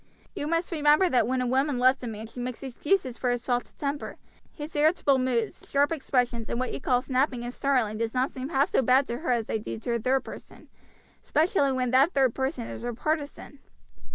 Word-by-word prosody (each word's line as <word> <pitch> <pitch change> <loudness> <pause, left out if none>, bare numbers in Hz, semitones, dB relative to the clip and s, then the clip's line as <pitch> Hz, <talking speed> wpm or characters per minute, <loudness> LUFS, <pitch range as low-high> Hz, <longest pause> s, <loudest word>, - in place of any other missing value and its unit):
You 290 - -3
must 335 +3 -1
remember 305 +3 +4
that 250 -5 +2
when 255 +1 0
a - - 0
woman 265 +2 +1
loves 255 +2 +3
a 245 - -5
man 220 -1 -6
she 230 +2 -11
makes 250 +1 -5
excuses 265 +1 -1
for 250 - 0
his 245 -1 -2
faults 245 -1 -1
of - - -35
temper; 285 0 -4 0.3
his 300 +1 -8
irritable 295 -3 +3
moods, 245 -3 -1
sharp 285 +2 +2
expressions, 245 -6 -1
and 235 - -2
what 255 - -2
you - - -5
call 250 -1 +1
snapping 255 -2 0
and 240 +1 -5
snarling 250 -7 0
do 230 - +1
not 255 +2 0
seem 260 +1 -6
half 275 -2 +2
so - - +2
bad 260 +2 +4
to 235 -1 -4
her 315 -4 -1
as 235 -2 +1
they 220 - -2
do 215 - -6
to 235 +2 -3
a 235 - 0
third 260 +4 +1
person, - - -12 0.5
especially 310 -3 +2
when 255 -2 -1
that 270 +7 +4
third 265 -4 +3
person 265 -2 -2
is - - -7
her 240 0 -4
partisan. 290 +1 -3
260 Hz, 225 wpm, -27 LUFS, 245-285 Hz, 0.5 s, remember